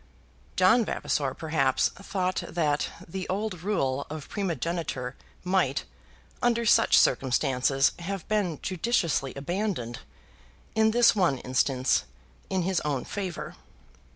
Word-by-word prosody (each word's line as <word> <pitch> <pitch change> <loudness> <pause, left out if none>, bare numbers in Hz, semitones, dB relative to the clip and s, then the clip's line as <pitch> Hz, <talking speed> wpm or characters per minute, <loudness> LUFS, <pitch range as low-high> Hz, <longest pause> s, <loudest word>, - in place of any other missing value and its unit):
John 225 +6 +5
Vavasor 140 -9 -1
perhaps 145 -5 +1
thought 185 -2 -2
that 150 -4 0 0.2
the 185 +2 -5
old 195 -2 -2
rule 140 -9 -1
of 155 -2 -7
primogeniture 170 - -3 0.3
might 180 -7 +1 0.6
under 235 -1 +2
such - - +5
circumstances 135 +1 +3
have 190 +1 -5
been 200 -7 0
judiciously 180 - 0
abandoned 145 - -3 0.7
in 220 0 +4
this 235 +1 +5
one 175 -9 +2
instance, 130 +1 +1 0.4
in 190 -2 0
his 185 0 +1
own 145 -4 -2
favour. 190 -5 -5
170 Hz, 110 wpm, -27 LUFS, 135-195 Hz, 0.7 s, John